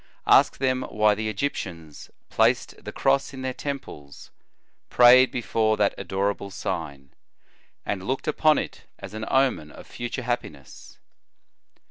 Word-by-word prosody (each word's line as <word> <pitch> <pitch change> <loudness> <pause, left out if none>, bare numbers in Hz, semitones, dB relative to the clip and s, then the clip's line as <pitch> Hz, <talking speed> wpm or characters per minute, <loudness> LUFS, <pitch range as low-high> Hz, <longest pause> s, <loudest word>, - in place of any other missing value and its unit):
Ask - - +5
them 130 -1 0
why 105 0 +3
the 110 +1 -3
Egyptians 90 - -5 0.2
placed - - +1
the - - -6
cross 135 0 0
in 130 - -7
their 130 0 -2
temples, 130 - -8 0.6
prayed 125 +1 +7
before 110 -2 0
that 100 -1 +2
adorable 100 +1 -3
sign, 70 -7 -5 0.7
and 95 -2 -4
looked 130 +1 -3
upon 155 0 +3
it - - -5
as - - -10
an 110 0 -5
omen 130 - +1
of - - -13
future 120 +2 -6
happiness. 120 +1 -6
110 Hz, 130 wpm, -24 LUFS, 100-130 Hz, 0.7 s, prayed